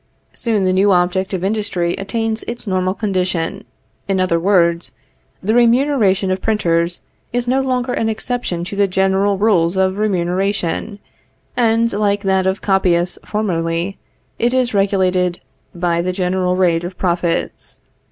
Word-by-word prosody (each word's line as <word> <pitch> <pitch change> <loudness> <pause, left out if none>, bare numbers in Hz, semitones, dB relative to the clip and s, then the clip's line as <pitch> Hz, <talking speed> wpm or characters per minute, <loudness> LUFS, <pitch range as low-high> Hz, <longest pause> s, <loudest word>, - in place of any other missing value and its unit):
Soon 220 -4 0
the 185 - +2
new 195 +2 +3
object 180 +1 +1
of 185 -2 -3
industry 195 -4 0
attains 225 +2 -2
its 235 +1 -6
normal 185 -1 0
condition; 185 -5 -2 0.4
in 195 -1 0
other 180 -2 +1
words, 170 -2 +2 0.5
the 215 +3 +1
remuneration 235 -5 +3
of 185 0 -1
printers 175 -5 0 0.3
is 245 0 -2
no 260 +2 +2
longer 255 -1 -1
an 225 - 0
exception 220 -6 -3
to 185 - -6
the 200 0 +3
general 190 +1 +1
rules 190 -4 +2
of 190 +1 +1
remuneration, 195 +1 -1 0.6
and, 230 -1 +2
like 205 0 0
that 190 -1 +1
of 190 +1 -1
copyists 180 -3 +1
formerly, 175 -2 -2 0.4
it 240 +2 +1
is 250 -2 +1
only 195 -1 +4
regulated 185 -2 0 0.4
by 170 -1 0
the 180 +1 -1
general 180 0 0
rate 175 -2 +2
of 175 +1 -6
profits. 170 -2 -1
190 Hz, 145 wpm, -18 LUFS, 180-215 Hz, 0.6 s, only